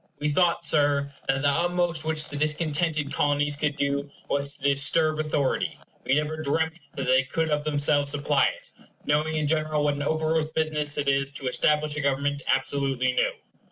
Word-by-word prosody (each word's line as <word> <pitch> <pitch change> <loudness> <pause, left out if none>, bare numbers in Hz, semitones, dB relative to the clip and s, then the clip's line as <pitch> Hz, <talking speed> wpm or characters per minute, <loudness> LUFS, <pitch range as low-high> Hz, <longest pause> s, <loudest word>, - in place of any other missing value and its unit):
We 150 - -1
thought, 170 +3 +2
Sir, 145 -2 +2
that 135 0 0
the - - +3
utmost 170 +1 0
which 155 -1 -2
the - - -8
discontented 155 0 -1
Colonies 145 0 +1
could 145 0 -1
do 140 0 -1 0.2
was 140 0 -1
to - - -18
disturb 155 +3 +2
authority; 150 -3 -1 0.3
we 130 - +2
never 150 +1 -1
dreamt 160 +3 -1 0.2
they 130 -1 +2
could 160 +4 -2
of 150 0 0
themselves 145 -1 +1
supply 145 0 +2
it - - -4 0.3
knowing 150 +2 +1
in 155 -1 0
general 155 0 0
what 145 -1 +2
an 145 - -5
operose 155 +1 0
business 150 -2 +1
it 145 -1 -1
is 135 0 +1
to 140 -2 -2
establish 150 +3 +1
a - - -1
government 140 +1 0
absolutely 135 -1 0
new. 125 - +1
145 Hz, 175 wpm, -26 LUFS, 140-155 Hz, 0.3 s, the